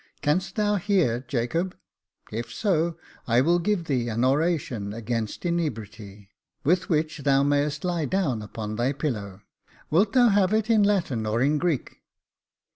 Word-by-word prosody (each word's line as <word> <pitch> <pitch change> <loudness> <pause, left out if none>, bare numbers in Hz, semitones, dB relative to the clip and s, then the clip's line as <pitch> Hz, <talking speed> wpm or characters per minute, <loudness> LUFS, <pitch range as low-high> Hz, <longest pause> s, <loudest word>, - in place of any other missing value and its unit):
Canst 170 +6 0
thou 210 -1 +1
hear, 180 - +1
Jacob? 150 +10 -1 0.5
if 115 +1 -4
so, 170 - 0 0.3
I 120 0 +4
will 170 +5 +3
give 180 -1 0
thee 125 -5 -1
an 115 +3 0
oration 135 - 0
against 115 - -3
inebriety, 110 - -4 0.3
with 175 +5 +1
which 155 -1 0
thou 140 -1 +3
mayest 145 +1 0
lie 175 -4 -1
down 145 - 0
on 110 -1 -4
thy 125 +4 +1
pillow. 105 -9 -4 0.5
Wilt 195 +6 +3
thou 245 -2 +6
have 200 -1 +3
it 220 +1 +1
in 220 -2 +5
Latin 170 - +1
or 110 +2 0
in 145 +4 +2
Greek 170 -6 -2
150 Hz, 150 wpm, -25 LUFS, 115-180 Hz, 0.5 s, thou